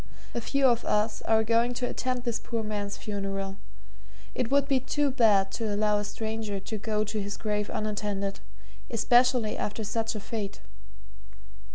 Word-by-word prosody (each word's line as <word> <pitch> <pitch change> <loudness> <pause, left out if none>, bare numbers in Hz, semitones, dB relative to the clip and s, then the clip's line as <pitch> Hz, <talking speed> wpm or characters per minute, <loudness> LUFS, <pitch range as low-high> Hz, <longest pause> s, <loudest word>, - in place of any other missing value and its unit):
A 235 - -2
few 275 +4 +1
of 240 -2 +4
us 210 +1 +1
are 220 0 +4
going 230 +2 +2
to 245 +1 -1
attend 255 -1 -2
this 235 -2 -1
poor 230 -1 -3
man's 205 -1 -3
funeral 195 -1 -3 0.8
it 245 - -1
would 280 0 +3
be 270 -2 +3
too 280 +2 +1
bad 210 -6 +4
to 220 0 -2
allow 210 0 +2
a - - -2
stranger 220 -1 -3
to 205 +3 -4
go 215 0 0
to 215 0 -2
his 205 +1 -4
grave 210 -1 -1
unattended, 205 -2 -2 0.5
especially 245 -2 +4
after 215 +2 -3
such 225 +2 -1
a - - -2
fate. 205 -1 -4
220 Hz, 165 wpm, -28 LUFS, 205-235 Hz, 0.8 s, of